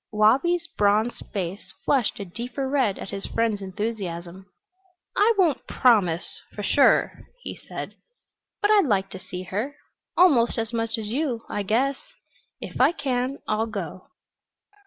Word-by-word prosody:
Wabi's 270 +12 +3
bronzed 210 +3 +2
face 195 0 -4
flushed 260 -7 +1
a 200 - -4
deeper 245 +8 -4
red 260 -8 +1
at - - -7
his 195 0 -5
friend's 225 -3 0
enthusiasm. 190 -3 -5 0.7
"I 425 +3 +5
won't 340 -8 +2
promise 190 -9 +2
for 205 - -5
sure," 275 +7 +3 0.2
he - - -5
said. - - -7 0.7
"But 410 - +4
I'd 410 -7 +5
like 195 -4 +1
to 190 - -7
see 180 0 -7
her 215 +10 -3 0.4
almost 270 -12 +5
as 225 0 -2
much 225 -1 -1
as 220 - -4
you, 250 -2 -1
I 205 - -2
guess. 250 +7 +1 0.6
If - - -4
I - - +5
can, 260 -2 -2
I'll 215 +1 0
go." 185 -5 -6
225 Hz, 145 wpm, -25 LUFS, 200-265 Hz, 0.7 s, I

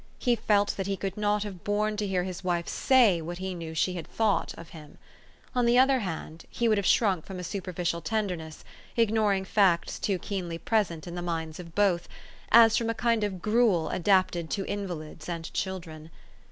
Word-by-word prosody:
He 245 -1 +2
felt 205 -2 +2
that 195 -1 -2
he 195 -1 -1
could 195 -1 -4
not 210 0 +1
have 195 -4 -8
borne 210 +1 0
to 210 -1 -1
hear 185 -2 0
his 185 +1 -6
wife 175 -2 -1
say 235 -10 +4
what 175 +2 -6
he 190 0 -4
knew 165 -2 -7
she 170 +4 +1
had 170 -3 -6
thought 220 -3 0
of 165 - -10
him. 150 -3 -13 0.6
On 245 -2 +2
the 240 +1 +4
other 265 +1 +5
hand, 165 -5 -6
he 235 - 0
would 215 -2 +3
have 200 - -1
shrunk 190 -8 +3
from 190 - -8
a 180 - -5
superficial 180 -2 -3
tenderness 180 -8 -3 0.3
ignoring 215 -4 +2
facts 185 -4 +2
too 195 -2 0
keenly 180 -3 -4
present 170 -4 -1
in 175 - -7
the 175 - -4
minds 165 -2 -4
of 170 -2 -10
both 195 -4 +2 0.4
as 225 -1 +7
from 230 -1 -1
a 230 - -1
kind 230 -1 +1
of 190 -4 -3
gruel 215 -8 +2
adapted 185 -3 +1
to 195 - -2
invalids 170 -5 -5
and 170 -1 -5
children. 165 -5 -5
190 Hz, 195 wpm, -28 LUFS, 170-210 Hz, 0.6 s, as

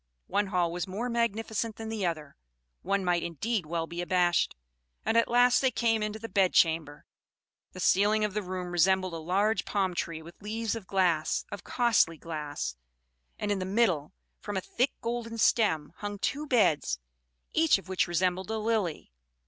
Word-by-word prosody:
One 200 +1 0
hall 180 -3 +1
was 175 +1 -3
more 215 +7 -3
magnificent 225 -1 -1
than 225 0 -6
the 215 -5 -1
other; 155 -4 -4 0.5
one 195 +1 0
might 175 -1 +2
indeed 175 - -2
well 165 0 -1
be 170 +1 -5
abashed; 175 -1 +2 0.5
and 225 - +1
at 230 - +4
last 245 +1 +4
they 265 - +4
came 225 -2 +1
into 210 0 -2
the 225 +1 -7
bedchamber. 165 -6 +2 0.7
The 185 - -9
ceiling 210 +4 +3
of 210 - -3
the 210 - -1
room 185 -1 -5
resembled 185 +1 +2
a - - -3
large 195 +5 +1
palm 195 -3 0
tree 165 -2 -3
with 170 +4 -14
leaves 220 +1 -2
of 215 -5 -8
glass, 180 -5 +1
of 205 - -6
costly 235 -9 +2
glass; 150 - -4 0.6
and 205 - -2
in 200 - 0
the - - -2
middle, 175 -11 +2 0.3
from 205 -2 -4
a - - 0
thick 250 +8 0
golden 230 -1 -3
stem, 185 -10 +2
hung 205 0 -5
two 290 +9 -2
beds, 190 - +2 0.6
each 320 -6 +4
of 195 - -12
which 190 0 +1
resembled 180 +2 0
a 220 - -1
lily. 215 - -1
195 Hz, 175 wpm, -29 LUFS, 175-220 Hz, 0.7 s, at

